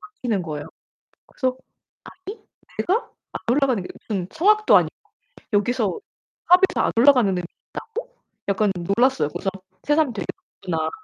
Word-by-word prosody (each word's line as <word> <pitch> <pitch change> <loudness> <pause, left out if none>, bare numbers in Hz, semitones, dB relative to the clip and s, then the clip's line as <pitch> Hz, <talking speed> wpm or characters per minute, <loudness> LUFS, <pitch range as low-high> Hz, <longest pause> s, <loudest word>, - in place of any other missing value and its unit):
막히는 250 - -3
거예요. 150 -3 -5 0.6
그래서 255 -2 -2 0.5
'아니 385 +4 -10 0.4
내가 405 +7 0 0.2
안 - - -5
올라가는 260 -4 +2
게 180 - -7 0.2
무슨 195 -5 -2
성악도 425 +6 +4
아니고 - - +1 0.6
여기서 215 0 +1 0.5
팝에서 365 +2 +4
안 - - 0
올라가는 245 -3 +5
음이 180 - -2 0.3
있다고?' - - -7 0.3
약간 200 +1 +2
놀랐어요. 200 - +2
그래서 195 - -3 0.3
새삼 295 -3 +2
'되게 205 - -4 0.4
높구나.' 160 -2 0
245 Hz, 320 characters per minute, -23 LUFS, -, 0.6 s, 올라가는